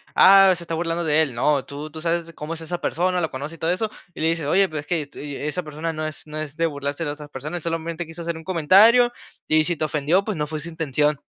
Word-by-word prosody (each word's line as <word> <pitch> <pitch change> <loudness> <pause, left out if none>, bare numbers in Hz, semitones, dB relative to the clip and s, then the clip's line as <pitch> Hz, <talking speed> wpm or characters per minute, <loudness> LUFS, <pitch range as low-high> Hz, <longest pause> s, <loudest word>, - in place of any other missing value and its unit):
"Ah, 195 0 +8
se 170 - -8
está 165 - -5
burlando 165 +1 -1
de 155 -1 +3
él". 140 -6 0
No, 140 +3 +2
tú 145 +2 -7
tú 160 +1 -8
sabes 170 0 -1
cómo 155 +1 -6
es 165 - -8
esa 175 +2 -4
persona, 180 +1 0
lo 160 -2 -1
conoces 145 +5 -6
y - - -29
todo 165 - +1
eso, 215 +4 -2 0.2
y - - -8
le 160 - +2
dices, 165 -2 -1
"Oye, 190 +6 +3
pero 155 - -4
es 145 - -9
que 170 -1 0
est 145 -1 -11
y 145 -1 -6
esa 150 +6 -3
persona 155 +2 -4
no 155 -1 -3
es 155 - -8
no 155 0 -7
es 155 -1 -5
de 165 +1 +1
burlarse 145 0 -3
de 145 - -2
otras 150 0 -9
personas, 150 +6 -6
solamente 165 +1 -3
quiso 165 +1 -9
hacer 170 -1 -3
un 160 - -11
comentario, 200 +8 +5 0.4
y 155 0 +4
si 175 +1 0
te 155 - -3
ofendió, 155 +5 +1
pues 210 -3 -3
no 150 -1 -1
fue 155 0 -4
su 165 - -5
intención". 150 -2 0
160 Hz, 280 wpm, -23 LUFS, 150-170 Hz, 0.4 s, Ah